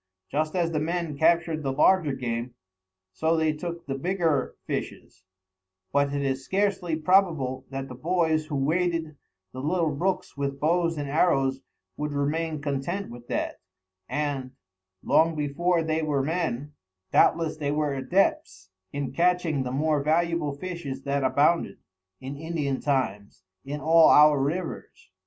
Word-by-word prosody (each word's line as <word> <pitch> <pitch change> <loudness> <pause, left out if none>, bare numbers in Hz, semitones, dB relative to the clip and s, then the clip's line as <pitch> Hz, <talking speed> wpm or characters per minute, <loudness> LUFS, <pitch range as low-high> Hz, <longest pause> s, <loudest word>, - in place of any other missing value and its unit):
Just 155 +3 -1
as 170 -2 +1
the 155 - 0
men 165 -1 -2
captured 160 +1 +2
the 135 -2 -1
larger 150 +2 +3
game, 120 -1 -4 0.6
so 160 +10 +1
they 160 -1 +2
took 170 +2 -6
the 135 - -3
bigger 165 -1 0
fishes; 95 - -6 0.7
but 140 0 +2
it 140 0 -1
is 135 -1 -1
scarcely 190 -2 0
probable 155 -6 +2
that 135 0 -5
the 130 - -8
boys 160 +2 0
who 150 - -4
waded 160 +2 0 0.4
the 130 - -7
little 165 +2 +1
brooks 180 +6 -2
with 140 -1 -3
bows 165 +1 +1
and 145 -1 -3
arrows 135 -3 +2 0.4
would 150 0 -3
remain 155 +2 -1
content 145 +5 -3
with 120 0 -11
that, - - -2 0.5
and, 135 -1 -2 0.5
long 165 0 +3
before 165 +4 0
they 160 0 0
were 145 -3 0
men, 150 -3 -2 0.4
doubtless 165 -2 +3
they 145 -2 -2
were 150 -1 0
adepts 130 - 0 0.2
in 140 -1 -3
catching 175 -4 +1
the 125 -1 -3
more 150 +2 +1
valuable 160 0 +1
fishes 150 -6 -6
that 140 0 -1
abounded, 145 +6 +2 0.4
in 135 +2 -6
Indian 150 -3 -2
times, 105 -9 -2 0.2
in 145 +2 -5
all 160 +2 +6
our 150 -2 +6
rivers. 160 - -4
150 Hz, 145 wpm, -26 LUFS, 135-165 Hz, 0.7 s, all